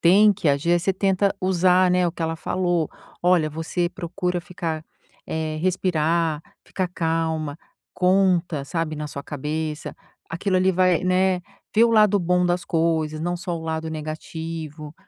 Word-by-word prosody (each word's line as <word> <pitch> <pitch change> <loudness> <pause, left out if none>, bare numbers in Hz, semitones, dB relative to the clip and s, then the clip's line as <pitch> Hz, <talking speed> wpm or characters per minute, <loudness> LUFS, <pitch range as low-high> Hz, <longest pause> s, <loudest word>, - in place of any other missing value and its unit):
tem 205 +5 +6
que 195 -5 -1
agir, 140 +4 +2
aí 175 - +4
você 190 +3 +1
tenta 195 +1 +1
usar, 185 0 +3
né, 180 0 +3
o 170 - -2
que 175 - -5
ela 165 0 -1
falou, 175 -1 0 0.3
"Olha, 175 -3 +3
você 165 +3 -2
procura 180 0 -3
ficar, 165 -3 -4 0.4
eh, 155 -1 -3
respirar, 165 -3 +1 0.2
ficar 185 -1 -2
calma, 160 -3 -1 0.4
conta, 180 -5 +2
sabe, 165 +1 -2
na 150 0 -4
sua 140 0 -6
cabeça, 150 +2 -4 0.3
aquilo 185 +3 -1
ali 185 +1 +4
vai, 185 -1 +3
né, 185 0 +2 0.3
vê 225 - +6
o 235 - +3
lado 210 -2 +5
bom 180 +1 +2
das 175 0 0
coisas, 160 -2 0
não 175 +2 -1
só 175 -1 -4
o 160 - -8
lado 160 0 -3
negativo 155 0 -6
170 Hz, 160 wpm, -23 LUFS, 160-185 Hz, 0.4 s, tem